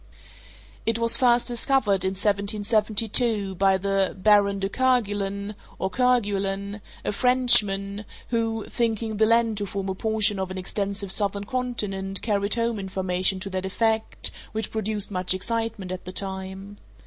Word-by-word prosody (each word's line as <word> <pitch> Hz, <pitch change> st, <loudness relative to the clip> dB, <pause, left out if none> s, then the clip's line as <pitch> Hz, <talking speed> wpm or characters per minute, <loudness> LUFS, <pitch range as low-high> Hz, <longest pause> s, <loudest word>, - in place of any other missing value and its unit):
It 225 Hz, 0 st, +1 dB
was 230 Hz, 0 st, +4 dB
first 245 Hz, -1 st, +3 dB
discovered 240 Hz, -5 st, +1 dB
in 190 Hz, 0 st, 0 dB
1772, 210 Hz, +1 st, +1 dB
by 190 Hz, +1 st, +3 dB
the 195 Hz, 0 st, 0 dB
Baron 200 Hz, 0 st, +4 dB
de 195 Hz, 0 st, -1 dB
Kergulen, 205 Hz, -4 st, 0 dB, 0.2 s
or 190 Hz, -, -2 dB
Kerguelen, 205 Hz, -5 st, 0 dB, 0.2 s
a -, -, 0 dB
Frenchman, 210 Hz, -4 st, +4 dB, 0.2 s
who, 225 Hz, -2 st, -1 dB
thinking 225 Hz, -2 st, -2 dB
the 220 Hz, +1 st, +4 dB
land 230 Hz, -1 st, +2 dB
to 205 Hz, -1 st, -2 dB
form 195 Hz, 0 st, -4 dB
a -, -, -1 dB
portion 215 Hz, 0 st, +1 dB
of 190 Hz, -1 st, -3 dB
an 185 Hz, -, -6 dB
extensive 200 Hz, +1 st, -3 dB
southern 200 Hz, 0 st, 0 dB
continent 205 Hz, -6 st, -3 dB
carried 200 Hz, -2 st, +1 dB
home 230 Hz, -2 st, -1 dB
information 190 Hz, 0 st, 0 dB
to 195 Hz, -, -4 dB
that 185 Hz, 0 st, -3 dB
effect, 220 Hz, +3 st, 0 dB, 0.2 s
which 220 Hz, -1 st, -3 dB
produced 215 Hz, -1 st, -1 dB
much 185 Hz, -1 st, +2 dB
excitement 225 Hz, -1 st, -3 dB
at 185 Hz, -, -6 dB
the 185 Hz, -, -6 dB
time. 190 Hz, +1 st, -6 dB
205 Hz, 145 wpm, -25 LUFS, 195-225 Hz, 0.2 s, was